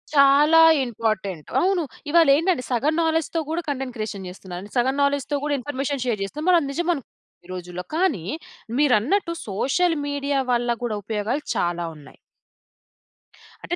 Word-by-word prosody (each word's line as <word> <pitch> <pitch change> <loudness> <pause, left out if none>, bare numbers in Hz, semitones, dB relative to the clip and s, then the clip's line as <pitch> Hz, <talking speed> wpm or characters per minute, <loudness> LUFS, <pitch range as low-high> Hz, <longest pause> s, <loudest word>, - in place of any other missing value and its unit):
చాలా 290 +3 +6 0.2
ఇంపార్టెంట్. 210 -8 -3
అవును. 370 -2 +2 0.3
ఇవాళేంటంటే 325 -1 +4
సగం 260 +6 +1
నా‌లెడ్జ్‌తో 325 0 0
గూడా 330 +2 -1
కంటెంట్ 265 -3 -3
క్రియేషన్ 205 -3 -5
జేస్తున్నారు. 180 -1 -8
అంటె 205 - -13
సగం 260 +2 +2
నా‌లెడ్జ్‌తో 285 0 +1
గూడా 295 -1 0
ఇన్ఫర్మేషన్ 275 0 -3
షేర్ 225 -5 -1
జేస్తే 275 +10 -6
మనం 360 -1 +6
అది 280 - -4
నిజం 345 +4 -1
అన్ 275 - -7 0.4
ఈ - - -16
రోజుల్లో 180 0 -6
కానీ 325 - +1 0.5
మీరన్నట్టు 295 - +2
సోషల్ 320 - +1
మీడియా 285 -1 -1
వల్ల 240 0 +1
గూడా 235 -3 -2
ఉపయోగాలు 220 +7 -2
చాలా 175 0 0
ఉన్నాయి. 150 -2 -15 1.5
అంటే 350 - -2
275 Hz, 145 wpm, -23 LUFS, 215-305 Hz, 1.5 s, చాలా